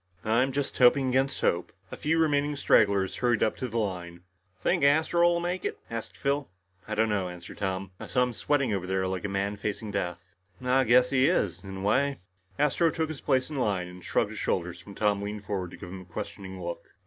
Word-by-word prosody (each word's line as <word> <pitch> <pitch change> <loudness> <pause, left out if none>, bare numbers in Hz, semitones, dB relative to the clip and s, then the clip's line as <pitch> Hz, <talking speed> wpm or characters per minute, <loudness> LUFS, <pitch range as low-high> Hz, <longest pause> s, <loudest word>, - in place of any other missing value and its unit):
"I'm 120 +5 +3
just 140 +1 -2
hoping 130 +1 +5
against 135 +2 +1
hope." 85 +1 +1 0.2
The - - -4
few 160 +2 0
remaining 145 -2 +2
stragglers 100 -8 +3
hurried 120 -3 +2
up 110 - +1
to 130 - -3
the 115 0 -4
line. 90 -5 -3 0.4
"Think - - +1
Astro'll 170 +4 +4
make 175 +1 -2
it?" - - -2
asked 115 -1 -5
Phil. 140 0 -1 0.4
"I 110 - -2
don't 110 +1 +3
know," 100 -4 0
answered 90 -1 -10
Tom, 95 -1 -2
"I - - -7
saw 125 - +2
him 125 -1 -1
sweating 135 -1 +1
over 95 -2 -2
there 95 0 0
like 95 0 -2
a - - -1
man 100 +1 -1
facing 105 +1 -3
death." 90 -3 -3 0.3
"I 130 +1 +2
guess 125 +2 +5
he 135 0 +4
is 90 - 0
in 95 0 -7
a - - -6
way." 135 +7 +2 0.4
Astro 150 +3 +3
took 160 0 -1
his 155 -3 -6
place 130 +2 +1
in 150 - -4
line 100 -8 0
and 90 0 -11
shrugged - - 0
his - - -6
shoulders 85 -1 -2
when 100 - -10
Tom 105 -2 +1
leaned 105 0 -5
forward 95 -4 -2
to - - -11
give 90 - -9
him 95 +1 -7
a - - -13
questioning 95 +2 -7
look. 85 -1 -7
110 Hz, 220 wpm, -28 LUFS, 95-135 Hz, 0.4 s, hoping